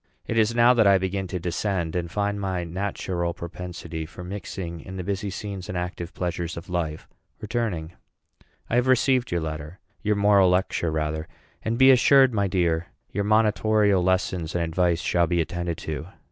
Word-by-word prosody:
It -, -, -3 dB
is 115 Hz, +1 st, +3 dB
now 120 Hz, +1 st, +6 dB
that 115 Hz, -4 st, +4 dB
I 100 Hz, -1 st, +6 dB
begin 95 Hz, +1 st, -2 dB
to 90 Hz, +1 st, -3 dB
descend, 90 Hz, -1 st, -2 dB
and 85 Hz, -1 st, -2 dB
find 100 Hz, +2 st, -1 dB
my 95 Hz, -2 st, -1 dB
natural 85 Hz, -1 st, -3 dB
propensity 85 Hz, -1 st, -6 dB
for 90 Hz, +2 st, -10 dB
mixing 90 Hz, -2 st, -6 dB
in 95 Hz, +4 st, -8 dB
the 90 Hz, -, -3 dB
busy 100 Hz, +2 st, -2 dB
scenes 95 Hz, -1 st, -6 dB
and 90 Hz, -, -3 dB
active 90 Hz, 0 st, -4 dB
pleasures 85 Hz, -2 st, -3 dB
of 85 Hz, +2 st, -8 dB
life 80 Hz, -3 st, -3 dB, 0.3 s
returning. 100 Hz, -8 st, -3 dB, 0.7 s
I 120 Hz, -, +1 dB
have 125 Hz, +1 st, +2 dB
received 130 Hz, 0 st, +3 dB
your 85 Hz, -1 st, 0 dB
letter 80 Hz, +2 st, -5 dB, 0.2 s
your 105 Hz, -1 st, +1 dB
moral 100 Hz, -2 st, +5 dB
lecture 90 Hz, -2 st, +1 dB
rather; 80 Hz, 0 st, -2 dB, 0.3 s
and 115 Hz, +1 st, -1 dB
be 130 Hz, +1 st, +8 dB
assured, 130 Hz, 0 st, +6 dB
my 100 Hz, -2 st, +1 dB
dear, 85 Hz, -3 st, 0 dB, 0.2 s
your 100 Hz, +1 st, -1 dB
monitorial 105 Hz, -2 st, +3 dB
lessons 90 Hz, -2 st, 0 dB
and 85 Hz, -, +1 dB
advice 85 Hz, +1 st, +1 dB
shall 85 Hz, -1 st, +2 dB
be 85 Hz, +1 st, +1 dB
attended 85 Hz, 0 st, -2 dB
to. 80 Hz, +1 st, -4 dB
90 Hz, 175 wpm, -25 LUFS, 85-105 Hz, 0.7 s, be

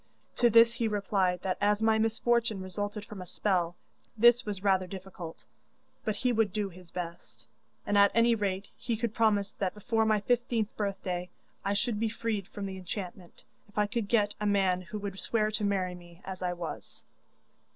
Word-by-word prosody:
To 240 Hz, -, +5 dB
this 230 Hz, +1 st, +7 dB
he 230 Hz, -1 st, 0 dB
replied 195 Hz, -3 st, 0 dB
that 185 Hz, -1 st, -1 dB
as 205 Hz, 0 st, +3 dB
my 220 Hz, 0 st, +3 dB
misfortune 225 Hz, -1 st, +1 dB
resulted 205 Hz, +2 st, -4 dB
from 205 Hz, -3 st, -8 dB
a -, -, -6 dB
spell, 175 Hz, -3 st, 0 dB, 0.4 s
this 240 Hz, +2 st, +6 dB
was 200 Hz, -2 st, -3 dB
rather 190 Hz, -2 st, +3 dB
difficult, 185 Hz, -3 st, -8 dB, 0.6 s
but 215 Hz, -, -1 dB
he 250 Hz, +3 st, +1 dB
would 220 Hz, -3 st, +2 dB
do 205 Hz, 0 st, -1 dB
his 180 Hz, -1 st, -13 dB
best, 165 Hz, -10 st, -7 dB, 0.4 s
and 205 Hz, -, 0 dB
at 200 Hz, 0 st, +7 dB
any 230 Hz, +1 st, +5 dB
rate 200 Hz, -3 st, -1 dB
he 235 Hz, -2 st, -2 dB
could 230 Hz, -1 st, -2 dB
promise 205 Hz, -3 st, +2 dB
that 190 Hz, -1 st, -1 dB
before 225 Hz, +1 st, +1 dB
my 215 Hz, -1 st, +3 dB
fifteenth 230 Hz, -1 st, 0 dB
birthday 185 Hz, -3 st, -2 dB, 0.3 s
I 200 Hz, +1 st, 0 dB
should 210 Hz, +1 st, 0 dB
be 225 Hz, 0 st, +1 dB
freed 215 Hz, -3 st, -2 dB
from 205 Hz, -, -6 dB
the 190 Hz, -1 st, -5 dB
enchantment 180 Hz, -1 st, -7 dB, 0.3 s
if 205 Hz, -, -21 dB
I 210 Hz, -, +4 dB
could 210 Hz, +1 st, -2 dB
get 210 Hz, -2 st, +2 dB
a 210 Hz, -, +1 dB
man 190 Hz, -3 st, +2 dB
who 185 Hz, +4 st, -6 dB
would 200 Hz, -2 st, -5 dB
swear 215 Hz, -2 st, +1 dB
to 215 Hz, 0 st, -2 dB
marry 190 Hz, -3 st, +1 dB
me 175 Hz, 0 st, -14 dB
as 190 Hz, -1 st, -6 dB
I 180 Hz, -1 st, 0 dB
was. 175 Hz, -2 st, -7 dB
205 Hz, 190 wpm, -30 LUFS, 185-220 Hz, 0.6 s, this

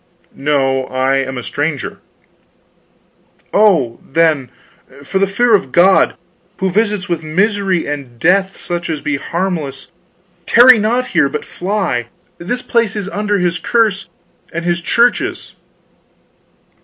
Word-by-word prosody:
"No, 135 Hz, -2 st, 0 dB
I 130 Hz, +1 st, 0 dB
am 135 Hz, -1 st, -3 dB
a 125 Hz, -, -5 dB
stranger." 145 Hz, 0 st, -3 dB, 1.5 s
"Oh, 185 Hz, -, +3 dB
then, 155 Hz, -4 st, +1 dB, 0.5 s
for 190 Hz, +7 st, -2 dB
the 195 Hz, -, +2 dB
fear 230 Hz, +4 st, +2 dB
of 185 Hz, -11 st, +2 dB
God, 190 Hz, +5 st, +4 dB, 0.4 s
who 190 Hz, 0 st, -1 dB
visits 205 Hz, 0 st, 0 dB
with 170 Hz, -2 st, -2 dB
misery 190 Hz, +3 st, 0 dB
and 140 Hz, -5 st, -6 dB
death 190 Hz, +8 st, +1 dB
such 175 Hz, -1 st, -4 dB
as 155 Hz, -2 st, -3 dB
be 150 Hz, -1 st, -1 dB
harmless, 155 Hz, -5 st, -4 dB, 0.6 s
tarry 240 Hz, 0 st, +7 dB
not 240 Hz, +4 st, 0 dB
here, 160 Hz, -6 st, +2 dB
but 150 Hz, -, -5 dB
fly! 180 Hz, -, -2 dB, 0.3 s
This 245 Hz, +9 st, -3 dB
place 230 Hz, -3 st, 0 dB
is 200 Hz, -2 st, -4 dB
under 205 Hz, 0 st, -1 dB
his 175 Hz, -2 st, 0 dB
curse 215 Hz, -4 st, 0 dB, 0.4 s
and 170 Hz, +1 st, -4 dB
his 175 Hz, 0 st, 0 dB
Church's." 235 Hz, +6 st, 0 dB
175 Hz, 130 wpm, -16 LUFS, 145-205 Hz, 1.5 s, tarry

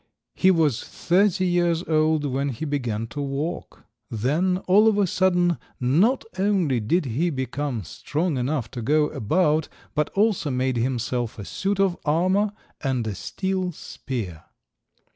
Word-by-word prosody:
He 190 Hz, -, +3 dB
was 160 Hz, -9 st, +2 dB
thirty 185 Hz, +1 st, +1 dB
years 175 Hz, -1 st, +1 dB
old 155 Hz, -2 st, +2 dB
when 140 Hz, +1 st, -1 dB
he 130 Hz, +4 st, -4 dB
began 120 Hz, -7 st, -2 dB
to 145 Hz, -, -5 dB
walk. 140 Hz, +5 st, -4 dB, 0.3 s
Then, 150 Hz, -, +1 dB
all 205 Hz, +4 st, +5 dB
of 215 Hz, -2 st, +3 dB
a 205 Hz, -, +4 dB
sudden, 180 Hz, -1 st, +2 dB, 0.2 s
not 170 Hz, -, +2 dB
only 185 Hz, -, +2 dB
did 155 Hz, +11 st, +1 dB
he 135 Hz, +8 st, 0 dB
become 130 Hz, -3 st, -3 dB
strong 150 Hz, -, -2 dB
enough 125 Hz, -2 st, -2 dB
to 120 Hz, -, -5 dB
go 150 Hz, +5 st, +2 dB
about, 155 Hz, -, +1 dB, 0.2 s
but 150 Hz, 0 st, 0 dB
also 200 Hz, -6 st, +2 dB
made 130 Hz, -1 st, 0 dB
himself 120 Hz, -1 st, -1 dB
a 100 Hz, -, -7 dB
suit 195 Hz, -, -2 dB
of 195 Hz, -3 st, +3 dB
armour 185 Hz, +7 st, +2 dB, 0.3 s
and 130 Hz, -4 st, 0 dB
a 110 Hz, -, -2 dB
steel 190 Hz, -, -2 dB
spear. 110 Hz, -, -6 dB
155 Hz, 145 wpm, -24 LUFS, 130-180 Hz, 0.3 s, all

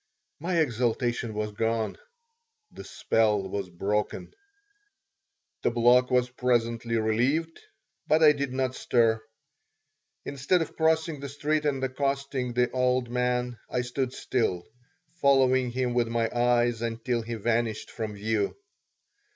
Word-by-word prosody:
My 170 Hz, +3 st, -1 dB
exaltation 120 Hz, -4 st, 0 dB
was 105 Hz, 0 st, -2 dB
gone. 110 Hz, +1 st, -1 dB, 0.8 s
The -, -, -10 dB
spell 105 Hz, -3 st, +1 dB
was 95 Hz, -1 st, -4 dB
broken. 100 Hz, +4 st, -2 dB, 1.3 s
The -, -, +2 dB
block 120 Hz, +2 st, +4 dB
was 125 Hz, -1 st, +2 dB
presently 115 Hz, -2 st, 0 dB
relieved, 125 Hz, +10 st, 0 dB, 0.5 s
but 155 Hz, +1 st, +4 dB
I 150 Hz, -, +9 dB
did 140 Hz, -2 st, -2 dB
not 130 Hz, 0 st, -1 dB
stir. 115 Hz, -3 st, +2 dB, 1.0 s
Instead 140 Hz, +6 st, +1 dB
of -, -, -11 dB
crossing 160 Hz, -1 st, +1 dB
the 140 Hz, 0 st, -6 dB
street 150 Hz, +2 st, -1 dB
and 135 Hz, -2 st, 0 dB
accosting 135 Hz, -1 st, -2 dB
the 125 Hz, 0 st, +1 dB
old 125 Hz, -1 st, +1 dB
man, 125 Hz, -1 st, -1 dB
I 125 Hz, -, 0 dB
stood 125 Hz, +1 st, -2 dB
still, 110 Hz, -10 st, -1 dB, 0.6 s
following 130 Hz, -2 st, +4 dB
him 125 Hz, 0 st, -1 dB
with 120 Hz, -1 st, +1 dB
my 115 Hz, 0 st, -1 dB
eyes 120 Hz, -1 st, +2 dB
until 115 Hz, +1 st, -2 dB
he 115 Hz, +1 st, -5 dB
vanished 115 Hz, 0 st, -1 dB
from 110 Hz, -2 st, -5 dB
view. 105 Hz, 0 st, -1 dB
125 Hz, 125 wpm, -27 LUFS, 115-130 Hz, 1.3 s, I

